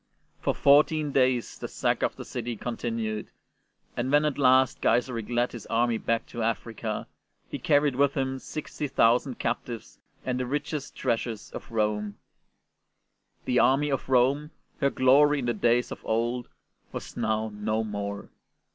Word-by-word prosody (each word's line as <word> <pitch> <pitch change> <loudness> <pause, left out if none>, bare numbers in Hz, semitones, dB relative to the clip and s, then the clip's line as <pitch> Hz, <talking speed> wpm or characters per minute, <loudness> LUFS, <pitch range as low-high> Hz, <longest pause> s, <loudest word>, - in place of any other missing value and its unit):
For - - 0
fourteen 150 +1 +4
days 130 -3 +1
the - - -4
sack - - 0
of - - 0
the - - -8
city 120 -1 -4
con 120 +3 -4
tinued, 110 -3 -3 0.7
and 125 +2 -1
when 145 +1 +4
at 145 -2 -1
last 130 -1 +4
Gaiseric 115 -1 +1
led 120 0 +1
his 120 - -9
army 115 -1 +1
back 115 0 0
to 120 - -5
Africa, 115 -1 -2 0.5
he - - -4
carried 145 -2 +3
with 140 +1 +2
him 130 -1 -1
60,000 130 -4 0
captives 115 -1 -4 0.3
and 125 -1 -1
the 125 - -2
richest 145 +1 -3
treasures 115 -3 -2
of - - -9
Rome. 105 -2 -1 1.3
The 125 - +2
army 145 +2 +3
of 135 - -2
Rome, 135 +4 +3 0.3
her 140 -2 +3
glory 140 +3 +5
in 135 - -2
the 120 - +1
days 120 +3 +2
of - - -7
old, 120 +2 -1 0.4
was - - -7
now 110 0 -1
no 110 +2 -1
more. 100 -1 -5
120 Hz, 155 wpm, -27 LUFS, 115-135 Hz, 1.3 s, glory